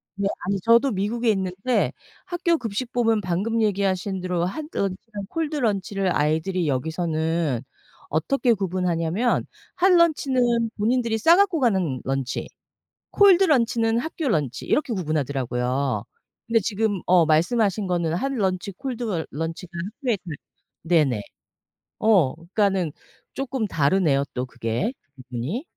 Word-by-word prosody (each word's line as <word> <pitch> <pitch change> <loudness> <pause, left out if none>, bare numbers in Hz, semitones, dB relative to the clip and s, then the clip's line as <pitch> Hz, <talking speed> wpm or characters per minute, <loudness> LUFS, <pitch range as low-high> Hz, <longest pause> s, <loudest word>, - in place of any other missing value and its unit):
네 200 0 0 0.2
아니 195 0 0
저도 235 +5 +4
미국에 220 +4 0
있는데 195 +5 0 0.3
학교 345 -2 +1
급식법은 225 -1 0
방금 200 +6 -1
얘기하신 195 -2 0
대로 180 -1 -1
핫 250 +12 -4
런치랑 200 +1 -4
콜드 320 -2 -2
런치를 195 -6 0
아이들이 160 +4 0
여기서는 160 -1 -1 0.5
어떻게 240 - +2
구분하냐면 180 +2 0 0.3
핫 370 +1 +4
런치는 260 -9 +3
본인들이 230 +1 +1
싸 330 +10 +6
갖고 385 -5 +3
가는 190 - +1
런치, 135 -1 -2 0.6
콜드 390 -2 +6
런치는 230 -5 +2
학교 320 +1 -3
런치 145 - -1
이렇게 280 -4 +1
구분하더라고요. 135 - -1 0.4
근데 230 -1 +3
지금 205 -1 -1
어 175 -2 +5
말씀하신 195 +5 +2
거는 170 -2 0
핫 275 +9 -1
런치 190 -4 -1
콜드 250 0 -5
러 180 -8 -2
런치가 165 +4 -5
학교에 220 - -2
다 - - -39 0.6
네네. 150 -10 +2 0.8
어 195 -11 +4
그니까는 185 -1 0 0.4
쪼끔 265 -4 -2
다르네요 145 -3 +2
또 125 0 -2
그게. 125 - -2 0.2
그 130 - -12
부분이. 135 - -3
195 Hz, 300 characters per minute, -24 LUFS, 165-235 Hz, 0.8 s, 싸